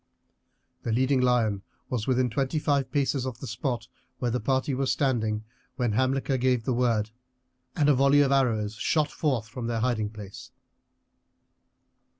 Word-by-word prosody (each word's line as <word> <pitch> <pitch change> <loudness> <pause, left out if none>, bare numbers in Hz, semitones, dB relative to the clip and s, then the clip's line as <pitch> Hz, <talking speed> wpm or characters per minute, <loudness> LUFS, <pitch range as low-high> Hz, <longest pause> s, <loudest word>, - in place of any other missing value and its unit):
The 115 - -3
leading 130 +3 +2
lion 115 -5 +2 0.3
was 120 -4 -2
within 130 -1 +2
twenty 135 +6 -1
five 145 -3 0
paces 140 -2 0
of 130 -3 -4
the - - -7
spot 115 +1 -3 0.3
where 120 -2 -1
the 125 - 0
party 130 +4 0
was 130 0 0
standing 110 -6 0 0.3
when 120 -4 0
Hamilcar 130 +3 +1
gave 125 -2 +1
the 130 - 0
word, 115 -3 +1 0.6
and 150 -4 +2
a 150 - +6
volley 140 +2 +5
of 140 -1 +2
arrows 115 -6 +2
shot 150 +7 0
forth 130 -8 -1
from 120 0 -5
their 115 -1 -1
hiding 115 -4 0
place. 105 -2 -10
125 Hz, 160 wpm, -27 LUFS, 115-135 Hz, 0.6 s, a